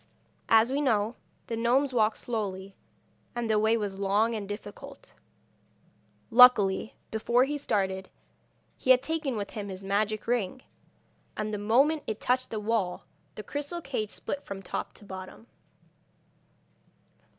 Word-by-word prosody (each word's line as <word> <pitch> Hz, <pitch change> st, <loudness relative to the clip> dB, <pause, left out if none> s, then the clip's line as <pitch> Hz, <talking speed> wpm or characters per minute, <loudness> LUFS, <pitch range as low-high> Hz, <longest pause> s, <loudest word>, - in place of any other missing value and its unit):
As 225 Hz, +2 st, +5 dB
we 280 Hz, +2 st, 0 dB
know, 225 Hz, -4 st, +1 dB, 0.3 s
the 230 Hz, -, -3 dB
gnomes 250 Hz, +4 st, +2 dB
walk 220 Hz, -2 st, +3 dB
slowly, 195 Hz, -4 st, -4 dB, 0.6 s
and 240 Hz, -1 st, -2 dB
the 215 Hz, -1 st, +3 dB
way 220 Hz, +2 st, +3 dB
was 200 Hz, -3 st, -3 dB
long 205 Hz, +4 st, +2 dB
and 205 Hz, -3 st, -4 dB
difficult. 210 Hz, -, -9 dB, 1.2 s
Luckily, 225 Hz, -5 st, +6 dB, 0.2 s
before 235 Hz, +3 st, +2 dB
he 290 Hz, +3 st, -1 dB
started, 190 Hz, -8 st, -1 dB, 0.7 s
he -, -, -5 dB
had 255 Hz, 0 st, +7 dB
taken 310 Hz, -4 st, -2 dB
with 205 Hz, -2 st, -4 dB
him 205 Hz, -2 st, -5 dB
his 190 Hz, 0 st, -7 dB
magic 205 Hz, +2 st, 0 dB
ring, 240 Hz, 0 st, -1 dB, 0.7 s
and 215 Hz, 0 st, -2 dB
the 210 Hz, -, -2 dB
moment 270 Hz, +9 st, +3 dB
it 215 Hz, -, -3 dB
touched 255 Hz, +1 st, 0 dB
the 220 Hz, -, -3 dB
wall 210 Hz, -4 st, -1 dB, 0.3 s
the 215 Hz, -, -7 dB
crystal 290 Hz, -, -4 dB
cage 255 Hz, -9 st, -3 dB
split 285 Hz, -, -5 dB
from 195 Hz, -1 st, -7 dB
top 180 Hz, -, -4 dB
to 205 Hz, -, -15 dB
bottom. 190 Hz, +3 st, -9 dB
220 Hz, 140 wpm, -28 LUFS, 200-250 Hz, 1.2 s, had